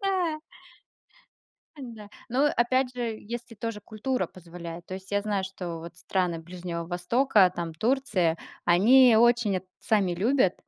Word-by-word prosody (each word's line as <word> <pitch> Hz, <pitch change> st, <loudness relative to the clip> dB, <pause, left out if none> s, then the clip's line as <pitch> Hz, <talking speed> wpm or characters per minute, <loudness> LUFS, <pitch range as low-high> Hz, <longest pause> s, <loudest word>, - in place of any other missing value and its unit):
Да. 355 Hz, -6 st, 0 dB, 1.4 s
Да. 230 Hz, -7 st, -9 dB, 0.2 s
Но 265 Hz, +5 st, +2 dB
опять 250 Hz, +1 st, +1 dB
же, 235 Hz, -3 st, -3 dB
если 235 Hz, +2 st, -7 dB
тоже 225 Hz, 0 st, -5 dB
культура 235 Hz, +5 st, -2 dB
позволяет. 170 Hz, -1 st, -10 dB
То 185 Hz, -, -6 dB
есть, 190 Hz, +1 st, -9 dB
я 205 Hz, -, +2 dB
знаю, 205 Hz, -2 st, -1 dB
что 180 Hz, -3 st, -6 dB
вот 170 Hz, +1 st, -10 dB
страны 180 Hz, -3 st, -1 dB
Ближнего 175 Hz, 0 st, -6 dB
Востока, 190 Hz, +3 st, +3 dB
там, 170 Hz, -1 st, -4 dB
Турция, 215 Hz, -, +1 dB, 0.3 s
они 230 Hz, +8 st, +6 dB
очень 235 Hz, -4 st, +4 dB
это 185 Hz, +1 st, -6 dB
сами 200 Hz, -5 st, +2 dB
любят, 205 Hz, +1 st, +2 dB
210 Hz, 140 wpm, -27 LUFS, 180-245 Hz, 1.4 s, они